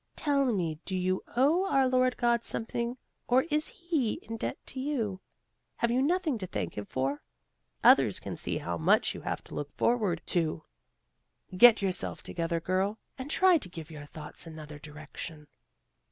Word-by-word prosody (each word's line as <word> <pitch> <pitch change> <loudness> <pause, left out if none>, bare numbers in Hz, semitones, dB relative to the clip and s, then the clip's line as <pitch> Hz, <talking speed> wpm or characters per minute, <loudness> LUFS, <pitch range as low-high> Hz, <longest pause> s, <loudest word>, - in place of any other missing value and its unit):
Tell 280 -2 +2
me 175 -10 0
do 190 - -3
you 185 +1 0
owe 320 +9 +4
our 270 -1 +4
Lord 255 0 +2
God 235 -1 +2
something 235 +2 -3 0.3
or 255 +2 +4
is 305 +1 +1
He 345 - -1
in 225 - -6
debt - - -3
to 260 - -7
you? 230 -9 -2 0.5
Have 235 - +1
you 250 +2 +2
nothing 315 -4 +1
to 185 - -4
thank 100 - -4
him 105 - -4
for? 135 +6 -2 0.6
Others - - +6
can - - -6
see - - -2
how 85 -1 -3
much 80 - +3
you - - -8
have - - -3
to - - -13
look 145 0 -4
forward 210 -8 +1
to. 160 -3 -1 0.9
Get 230 +1 +8
yourself 185 -2 -2
together, 170 0 -2
girl, 190 +5 0 0.2
and 260 +2 -5
try 365 +1 +5
to 185 - -8
give 165 -2 -9
your 145 -2 -9
thoughts 150 +2 -8
another 155 -2 -9
direction." 155 +1 -9
205 Hz, 170 wpm, -30 LUFS, 160-260 Hz, 0.9 s, Get